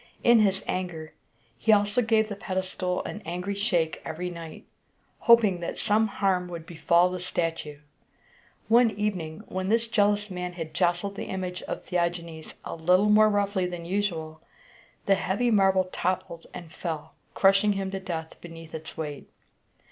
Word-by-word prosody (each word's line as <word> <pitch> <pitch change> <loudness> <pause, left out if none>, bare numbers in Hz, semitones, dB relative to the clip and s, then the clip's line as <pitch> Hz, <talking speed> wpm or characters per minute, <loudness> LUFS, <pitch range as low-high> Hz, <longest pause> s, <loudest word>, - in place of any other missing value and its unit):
In 235 -1 +6
his 195 -2 +2
anger, 170 -4 -4 0.5
he 220 - +3
also 205 +3 +4
gave 220 -1 +2
the 205 - -5
pedestal 185 -1 -2
an 215 - -6
angry 180 +4 -3
shake 180 -6 0
every 180 +3 -4
night, 165 -2 -9 0.5
hoping 220 -6 +5
that 170 - -4
some 220 +1 +2
harm 190 -3 0
would 170 -2 -7
befall 170 +2 +3
the 185 - -4
statue. 165 -4 -3 0.9
One 235 +1 +6
evening, 195 -7 -3
when 185 +1 -3
this 230 +1 +2
jealous 205 -2 +2
man 180 -1 -4
had 165 -3 -6
jostled 175 +4 +1
the - - -5
image 185 -1 -4
of - - -5
Theagenes 170 -2 -3
a - - -5
little 180 +5 +3
more 215 +1 +6
roughly 200 -2 +1
than 175 -1 -6
usual, 170 -5 -2 0.6
the 200 - +4
heavy 195 +5 0
marble 195 -3 +4
toppled 175 -2 -3
and 165 -2 -10
fell, 160 -4 -5 0.2
crushing 195 +2 +4
him 195 -1 -3
to 195 - -3
death 165 -4 -6
beneath 165 -1 -11
its 160 0 -7
weight. 150 -3 -6
185 Hz, 155 wpm, -27 LUFS, 170-205 Hz, 0.9 s, In